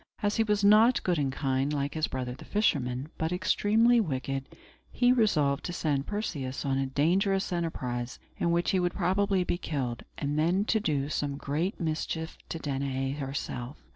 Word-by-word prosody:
As 205 0 +1
he 225 - +4
was 210 -1 +1
not 215 +5 +6
good 175 -4 +1
and 135 -2 0
kind, 135 0 0
like 140 -1 -1
his 155 -1 0
brother 125 -1 -4
the 130 - -11
fisherman, 135 - 0
but 160 +1 0
extremely 215 +6 +3
wicked, 135 - -2 0.4
he 245 0 +3
resolved 150 - +2
to 175 - -3
send 145 -5 -1
Perseus 145 -12 -3
on 135 -1 +1
a 135 - 0
dangerous 185 +8 +1
enterprise, 125 -8 -3 0.2
in 170 - +1
which 170 +1 +2
he 190 - +2
would 180 0 0
probably 190 +1 +2
be 175 - -1
killed, 130 -8 -3 0.2
and 145 +1 -1
then 180 +6 +2
to 220 - +2
do 145 -8 0
some 145 -2 -2
great 155 +9 -2
mischief 160 0 -2
to - - -3
Danaë 135 -2 -2
herself. 135 -1 -4
155 Hz, 175 wpm, -29 LUFS, 135-190 Hz, 0.4 s, not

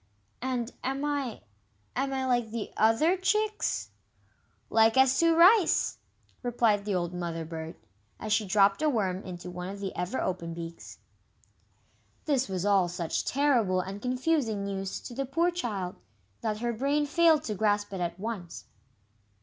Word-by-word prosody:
"And 250 -1 -2
am 270 +2 -2
I 280 -6 -2 0.5
am 270 +2 0
I 265 -1 -1
like 240 -3 +1
the 225 -1 -5
other 225 - +4
chicks?" 380 - 0 0.8
"Like 225 +2 +4
as 265 0 +5
two 335 -1 +4
rice!" 365 +3 +5 0.4
replied 230 -4 +1
the 205 -2 0
old 175 -1 -1
Mother 170 -2 -4
bird, 160 0 -6 0.4
as 215 -1 -1
she 220 - +2
dropped 195 +3 +4
a 310 - +3
worm 195 -8 0
into 180 -1 -7
one 180 +1 -5
of 200 +1 -7
the 195 -1 -5
ever 180 +8 -2
open 170 -2 -3
beaks. 165 0 -8 1.3
This 270 -7 +1
was 185 0 -2
all 195 -3 +4
such 170 -2 -2
terrible 245 -10 +2
and 195 +2 -5
confusing 250 -4 0
news 195 -1 -3
to 245 - -8
the 275 - -2
poor 335 +6 +2
child, 205 - -3 0.4
that 215 -1 -2
her 240 0 0
brain 280 +5 +1
failed 320 +1 +4
to 215 - -3
grasp 205 0 0
it 190 - -4
at 170 +1 -3
once. 200 -5 -6
220 Hz, 160 wpm, -29 LUFS, 185-270 Hz, 1.3 s, as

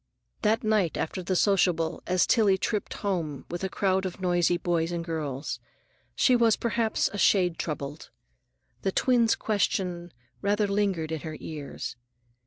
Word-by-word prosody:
That 220 +2 +2
night 215 -6 +1
after 185 +4 -2
the 185 +1 -1
sociable, 175 -4 +2
as 180 0 +3
Tillie 210 -5 +4
tripped 210 +2 -2
home 165 -8 -2
with 175 +2 -4
a 190 - -1
crowd 190 0 +1
of 185 0 -5
noisy 175 -1 +2
boys 170 -1 0
and 170 -1 -3
girls, 150 -4 -3 0.6
she 255 - +4
was 230 -3 +4
perhaps 230 -1 0
a 205 - -4
shade 180 -5 +3
troubled. 150 -1 -5 0.7
The 195 - 0
twin's 235 +1 +3
question 180 -4 -1 0.3
rather 205 +1 +2
lingered 195 -6 0
in 160 - -2
her 155 +1 -6
ears. 145 -5 -6
185 Hz, 150 wpm, -27 LUFS, 165-205 Hz, 0.7 s, Tillie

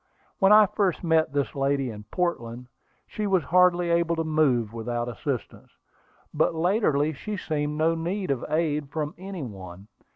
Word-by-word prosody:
When 195 0 +5
I 215 0 +8
first 190 -3 -1
met 160 -3 +2
this 140 -1 -1
lady 135 -2 0
in 105 -1 -10
Portland, 125 -5 -3 0.4
she 210 -1 -4
was 190 -4 +2
hardly 180 -1 +3
able 170 0 +2
to 165 - -1
move 135 -8 +1
without 120 +1 -3
assistance; 125 +1 -5 0.6
but 155 +2 +1
latterly 160 -4 +1
she 210 +9 -5
seemed 150 -3 -2
to 165 +1 +2
need 175 +2 -2
no 130 -3 -2
aid 150 -2 0
from 150 0 -3
any 190 -4 -6
one. 95 -3 -10
155 Hz, 160 wpm, -26 LUFS, 130-175 Hz, 0.6 s, I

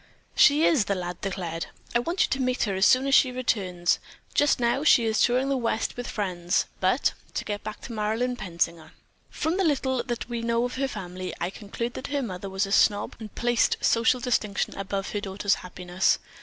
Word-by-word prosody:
"She 300 +2 +6
is!" 270 -11 +3
the 200 - 0
lad 175 -1 -5
declared. 175 -4 -3 0.3
"I 240 - +4
want 335 +9 +1
you - - 0
to 265 - 0
meet 255 0 +1
her 200 - -1
as 190 +1 +4
soon 255 +1 +4
as 275 - 0
she 260 -1 +6
returns. 190 -8 0 0.3
Just 290 -2 +3
now 240 +4 +1
she 245 -6 +5
is 220 0 +1
touring 255 +3 +3
the 275 - +1
West 230 -3 -1
with 245 0 -5
friends, 180 -4 -1
but, - - +2 0.2
to - - -2
get 205 -1 -4
back 215 0 -7
to 240 - -8
Marilyn 225 +4 -1
Pensinger. 170 -5 -3 0.4
From 320 +4 -1
the 390 - +2
little 265 -5 +1
that 240 -2 -4
we 235 -1 -3
know 235 +1 +1
of 245 - -4
her 275 0 0
family, 185 -5 -6
I 175 - -2
conclude 230 +4 -5
that - - -6
her 285 -1 -1
mother 195 -3 -5
was 190 +1 0
a 195 - -7
snob 205 0 +3
and 215 -2 -9
placed 240 0 +2
social 230 +2 +3
distinction 225 -5 -1
above 195 0 -3
her 205 - -2
daughter's 200 0 0
happiness. 180 0 0
220 Hz, 210 wpm, -26 LUFS, 190-250 Hz, 0.4 s, She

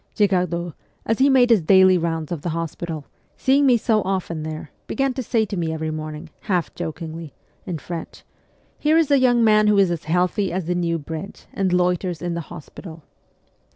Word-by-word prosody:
Girardot, 180 -4 +1 0.3
as 225 - 0
he 275 +2 +5
made 250 -3 +5
his 220 -5 +5
daily 190 +2 +6
rounds 165 -2 -2
of 170 -4 -3
the 175 - -3
hospital, 165 -2 -5 0.3
seeing 275 +2 +3
me 245 -2 +5
so 220 -1 +1
often 185 -4 -2
there, 155 -1 -6 0.2
began 270 -1 0
to 260 - -3
say 225 -2 +1
to 200 - -5
me 165 -3 -1
every 160 0 -3
morning, 155 0 -6
half 180 -5 -1
jokingly, 160 -2 -6 0.3
in 175 - -3
French, 165 +1 -8 0.3
' - - -38
Here 310 +2 +3
is 320 -3 +2
a 280 - +5
young 245 -2 +4
man 215 -1 +5
who 210 -1 +4
is 195 -3 +4
as 170 - -4
healthy 180 +4 +1
as 185 0 -2
the 180 - 0
New 170 -1 0
Bridge, 160 +5 -8
and 195 -2 0
loiters 180 -1 0
in 175 -1 -3
the 170 - -3
hospital.' 160 +1 -10
180 Hz, 195 wpm, -22 LUFS, 165-215 Hz, 0.3 s, daily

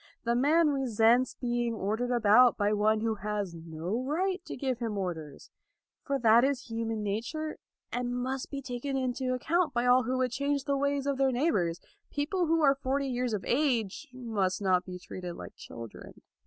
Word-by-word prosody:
The 235 - +1
man 300 +5 +4
resents 245 -2 +3
being 240 -1 -1
ordered 220 +4 -1
about 240 0 +5
by 205 0 +2
one 215 +1 +2
who 225 0 +1
has 205 -3 -2
no 165 +6 -4
right 360 +6 -1
to - - -6
give 260 -2 -2
him 225 -4 -2
orders. 160 -7 -5 0.5
For 275 - -1
that 235 -1 +5
is 265 -3 -1
human 225 -1 -2
nature, 235 +10 -3 0.3
and 245 0 -2
must 255 +1 -3
be 280 -1 -5
taken 270 +2 -3
into 255 0 -1
account 325 +4 0
by 240 +1 +1
all 250 +1 +6
who 255 +2 -1
would 255 -1 +1
change 280 +1 -1
the 280 0 0
ways 280 0 0
of 280 -1 -1
their 270 -1 +3
neighbors. 200 - +1 0.3
People 330 +5 -1
who 325 0 +2
are 275 -2 +6
forty 275 +1 0
years 250 -1 -1
of 195 - -5
age 250 -2 0
must 220 -7 -1
not 185 -3 +2
be 180 -1 -7
treated 180 -1 -7
like - - -9
children. 115 -2 -10
245 Hz, 180 wpm, -30 LUFS, 210-275 Hz, 0.5 s, all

